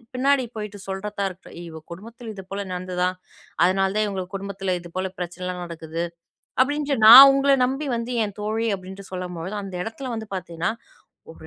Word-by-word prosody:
பின்னாடி 270 +1 +3
போயிட்டு 210 -1 -6
சொல்றதா 200 +1 -4
இருக்கட்டும். 185 0 -13
"இவ 160 -1 -9
குடும்பத்துல 225 +5 -9
இதுபோல 195 +1 -6
நடந்ததாம், 180 0 -1 0.5
அதுனால 190 +1 +2
தான் 215 - +3
இவங்க 190 -2 -3
குடும்பத்துல 195 -1 -3
இதுபோல 185 +2 -4
பிரச்சனலாம் 180 +1 -4
நடக்குது," 165 0 -5 0.6
அப்படின்ட்டு 290 +1 +1
நான் 260 +5 +13
உங்கள 275 +1 +3
நம்பி 270 +4 -2
வந்து 235 +1 -3
என் 205 -2 -7
தோழி 220 +2 -1
அப்படின்டு 190 +1 -10
சொல்லும்பொழுது, 180 +1 -5
அந்த 195 -2 -7
இடத்துல 255 +5 -6
வந்து 220 -1 -6
பார்த்தீங்கன்னா, 175 +1 -2 0.6
ஒரு - - -14
195 Hz, 150 wpm, -24 LUFS, 180-225 Hz, 0.6 s, நான்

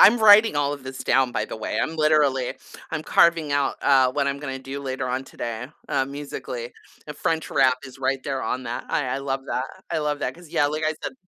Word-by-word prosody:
I'm 235 +4 +8
writing 215 -3 +7
all 145 0 +1
of 140 -2 -8
this 130 0 -7
down, 130 -2 +2
by - - 0
the - - -7
way, 110 - -3
I'm 160 - -3
literally 150 -5 +2 0.4
I'm 160 - -2
carving 165 -2 +3
out, 140 -1 +1
uh, 130 -2 +5
what 140 0 0
I'm 140 - -2
gonna 135 -2 -5
do 135 +1 -6
later 130 -2 -3
on 130 +1 -2
today, 115 -2 -5 0.2
uh, 135 -1 +1
musically. 135 -4 -6 0.3
The 150 - -7
French 160 +2 -1
rap 130 -1 +3
is 130 0 -11
right 135 0 0
there 135 -2 -2
on 130 - -2
that. 120 0 -4
I 145 - 0
I 130 +2 -1
love 135 -1 -2
that, 130 - -1 0.3
I 165 - 0
love 150 -1 -1
that, 125 - -2
'cause, 175 -2 -15
yeah, 145 - +2
like 155 +2 -2
I 155 - +2
said - - -3
140 Hz, 235 wpm, -24 LUFS, 130-150 Hz, 0.4 s, I'm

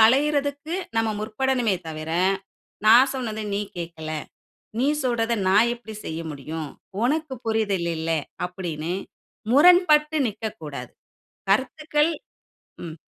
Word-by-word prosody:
களையரதுக்கு 285 +5 +3 0.2
நம்ம 225 0 +2
முற்படனுமே 235 -1 0
தவிர, 155 0 -5 0.8
நான் 245 +5 +8
சொன்னத 220 -4 -3
நீ 200 - 0 0.2
கேக்கல. 165 -2 -6 0.7
நீ 265 - +3 0.2
சொல்ரத 235 -2 +1 0.2
நான் 215 +5 +5
எப்புடி 230 -2 -10
செய்ய 160 +1 -4
முடியும்? 150 +2 -5 0.4
ஒனக்கு 300 +1 0
புரிதல் 205 -6 0
இல்ல. 160 +1 -2 0.3
அப்படின்னு 175 -3 -4 0.6
முரண்பட்டு 310 0 +6
நிக்கக்கூடாது. 155 - -6 0.6
கருத்துக்கள் 300 +7 +2 0.7
ம். 160 -1 -7
225 Hz, 100 wpm, -24 LUFS, 170-280 Hz, 0.8 s, நான்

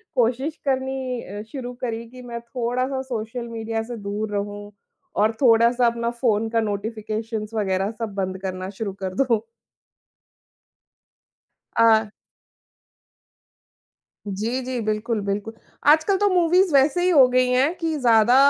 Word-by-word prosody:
कोशिश 255 +5 +1
करनी 265 -2 -1
अ, 205 +2 -7
शुरू 250 -3 -5
करी 230 -2 -3
कि 255 +1 -12
मैं 240 -1 -6
थोड़ा-सा 250 +3 -2
सोशल 235 -1 -5
मीडिया 225 -1 -3
से 240 +2 -6
दूर 210 +1 -4
रहूँ, 205 0 -4 0.4
और 215 +2 +3
थोड़ा-सा 235 0 +5
अपना 235 0 0
फ़ोन 225 -2 0
का 230 - +1
नोटिफ़िकेशंस 215 +1 -4
वगैरह 195 -2 0
सब 225 -3 -3
बंद 190 -1 -2
करना 185 -1 -4
शुरू 210 -3 -2
कर 190 -1 -3
दूँ। 235 -3 +2 2.4
अ 220 -2 +5 2.2
जी, 220 +6 -2
जी, 255 -1 -3
बिल्कुल, 215 +1 -1
बिल्कुल। 205 +2 -2 0.4
आजकल 315 +6 +5
तो 410 +1 +3
मूवीज़ 360 -1 +3
वैसे 280 +5 +4
ही 365 - +3
हो 280 -7 +7
गई 255 0 +3
हैं 260 +6 +3
कि 325 -2 -1
ज़्यादा 235 -1 +5
230 Hz, 135 wpm, -23 LUFS, 215-255 Hz, 2.4 s, हो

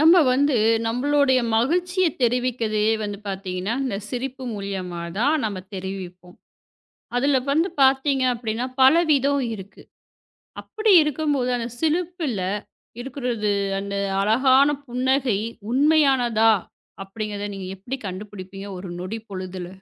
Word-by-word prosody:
நம்ம 325 +4 +7 0.2
வந்து 280 +1 +2 0.3
நம்மளோடைய 260 +2 +2 0.2
மகிழ்ச்சிய 355 +9 +1 0.2
தெரிவிக்கதே 240 -3 +1 0.2
வந்து 205 -1 -4
பாத்தீங்கன்னா, 190 +1 -3
இந்தச் 205 -5 -4
சிரிப்பு 260 +1 -4
மூலியமா 190 -4 -5 0.2
தான் 290 +7 +3
நம்ம 205 -3 -2 0.2
தெரிவிப்போம். 185 -1 -7 0.8
அதுல 275 +2 +3
வந்து 325 +6 +2
பாத்தீங்க 265 0 +3
அப்டின்னா, 235 +1 -3
பல 260 +3 +8 0.2
விதம் 280 -1 +2
இருக்கு. 195 -1 -12 0.8
அப்டி 435 0 0
இருக்கும்போது 290 -4 0
அந்தச் 240 0 -6
சிரிப்புல 325 - -1 0.6
இருக்கிறது 240 -5 -2 0.3
அந்த 200 0 -4 0.2
அழகான 260 +7 +4 0.2
புன்னகை 255 -2 +1 0.3
உண்மையானதா? 260 -6 +4 0.5
அப்டிங்கறத 205 0 -5
நீங்க 195 -1 -6
எப்படி 245 +8 -5
கண்டுபிடிப்பீங்க 195 0 -8
ஒரு 185 +1 -8
நொடி 185 +5 -4
பொழுதில? 185 -2 -6
240 Hz, 110 wpm, -23 LUFS, 200-275 Hz, 0.8 s, பல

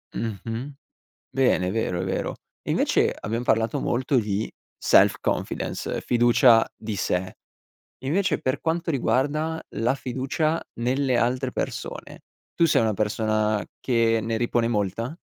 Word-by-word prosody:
Mh-mh, 115 +5 -4 0.6
bene 125 -9 +2
è - - -1
vero, 100 -5 -1
è - - -2
vero. 95 - -2 0.3
E - - -5
invece, - - +2
abbiam 115 +3 -3
parlato 115 -2 +1
molto 130 +3 0
di 105 -1 -1 0.3
self - - +5
confidence, - - -2
fiducia 120 -1 +5
di 110 -1 -5
sé, 95 -1 -1 0.7
invece 180 +8 +1
per 130 - -1
quanto 165 +1 -1
riguarda 150 +4 0 0.2
la 120 +4 +2
fiducia 140 +5 -1
nelle 130 +2 0
altre 125 +2 0
persone, - - -5 0.3
tu 170 - +4
sei 150 - +3
una 110 -1 +2
persona 110 0 0 0.2
che 115 -2 +2
ne 115 +1 -1
ripone 120 0 +1
molta? 115 - -2
120 Hz, 135 wpm, -25 LUFS, 110-135 Hz, 0.7 s, self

